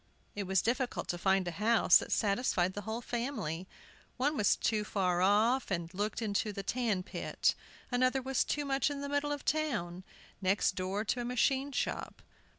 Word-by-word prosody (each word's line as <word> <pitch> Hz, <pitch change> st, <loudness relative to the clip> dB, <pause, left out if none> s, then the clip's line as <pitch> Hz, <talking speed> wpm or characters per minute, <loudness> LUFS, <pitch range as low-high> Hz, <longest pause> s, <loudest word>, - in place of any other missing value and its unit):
It 200 Hz, -2 st, -3 dB
was 190 Hz, -1 st, +2 dB
difficult 250 Hz, +2 st, -1 dB
to 175 Hz, -, -1 dB
find 190 Hz, -1 st, +2 dB
a -, -, -1 dB
house 215 Hz, +1 st, +5 dB
that -, -, -6 dB
satisfied 200 Hz, -4 st, +1 dB
the 205 Hz, -, -5 dB
whole 225 Hz, +2 st, -3 dB
family. 230 Hz, -, -3 dB, 0.5 s
One 285 Hz, +4 st, +1 dB
was 210 Hz, -7 st, +3 dB
too 215 Hz, -2 st, 0 dB
far 185 Hz, -4 st, 0 dB
off, 220 Hz, +7 st, +3 dB
and 170 Hz, -2 st, -3 dB
looked 210 Hz, +4 st, -2 dB
into 210 Hz, 0 st, 0 dB
a 200 Hz, -, -3 dB
tan 220 Hz, -4 st, 0 dB
pit; -, -, 0 dB, 0.4 s
another 255 Hz, +2 st, +2 dB
was 265 Hz, 0 st, 0 dB
too 295 Hz, -1 st, -2 dB
much 275 Hz, +1 st, +1 dB
in 285 Hz, -1 st, -4 dB
the 280 Hz, -, -4 dB
middle 285 Hz, +1 st, 0 dB
of 290 Hz, -1 st, -4 dB
the -, -, +4 dB
town, 210 Hz, -, -3 dB, 0.4 s
next 190 Hz, +1 st, +2 dB
door 190 Hz, +3 st, -2 dB
to 245 Hz, +4 st, -1 dB
a -, -, -3 dB
machine 265 Hz, +3 st, +1 dB
shop. 255 Hz, -, -3 dB
220 Hz, 185 wpm, -32 LUFS, 190-260 Hz, 0.5 s, house